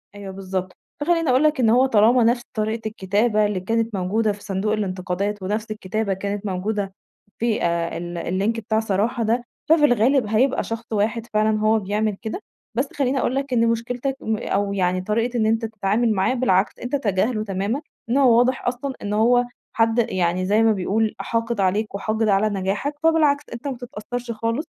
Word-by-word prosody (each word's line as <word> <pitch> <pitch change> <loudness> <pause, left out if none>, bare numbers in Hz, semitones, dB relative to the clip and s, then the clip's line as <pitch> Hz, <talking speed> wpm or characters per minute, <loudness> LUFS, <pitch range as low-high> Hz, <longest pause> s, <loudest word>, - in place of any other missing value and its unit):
أيوه 200 -1 -7
بالضبط، 190 -1 -4 0.3
فخلّيني 330 -2 +1
أقول 255 +4 +4
لك 305 -3 +2
إن 230 - +4
هو 250 +4 +5
طالما 235 0 +4
نفْس 240 +1 +3
طريقة 220 0 -2
الكتابة 210 +1 +1
اللي 205 -3 -1
كانت 225 +2 -1
موجودة 210 +4 +1
في 205 0 -9
صندوق 200 +1 -1
الأنتقادات، 195 0 -2
ونفْس 215 +3 -2
الكتابة 215 0 -2
كانت 200 +2 -4
موجودة 195 +1 -2 0.5
في 230 -5 0 0.3
ال 175 0 -5 0.2
الLink 225 +3 0
بتاع 220 -1 0
صراحة 220 +3 0
ده، 235 +3 +1 0.3
ففي 315 -2 +6
الغالب 245 -1 +3
هيبقى 240 +6 +2
شخص 225 +1 -5
واحد 220 +2 0
فعلًا 215 0 +2
هو 215 +1 +3
بيعمل 205 +1 -1
كده، 225 - -4 0.4
بس 270 +3 +1
خلّيني 270 -1 0
أقول 255 - 0
لك 275 -1 -2
إن 230 -1 +3
مشكلتك 245 +4 -1
م 220 -1 -1
أو 200 0 -1
يعني 185 -1 +1
طريقة 230 +5 -1
إن 220 - +2
أنت 225 +1 +1
تتعامل 215 +1 0
معاه، 190 +5 +1
بالعكس 215 -6 +1
أنت 250 +4 -3
تجاهله 215 -1 0
تمامًا، 200 +7 -2 0.3
إن 250 - +2
هو 250 -4 +5
واضح 250 +1 +2
أصلًا 255 +2 -2
إن 205 - -3
هو 245 +3 +4 0.3
حد 225 +1 +2
يعني 185 0 0
زي 210 +3 +3
ما 225 - +5
بيقول 215 +2 0
حاقد 230 -1 -2
عليك 200 +2 0
وحاقد 220 +2 -1
على 200 +2 +3
نجاحك، 205 +8 -2
فبالعكس 305 -3 +3
أنت 235 +4 -6
ما 265 -3 -3
تتأثّرش 245 0 -6
خالص، 230 +7 -2
220 Hz, 180 wpm, -22 LUFS, 200-240 Hz, 0.5 s, ففي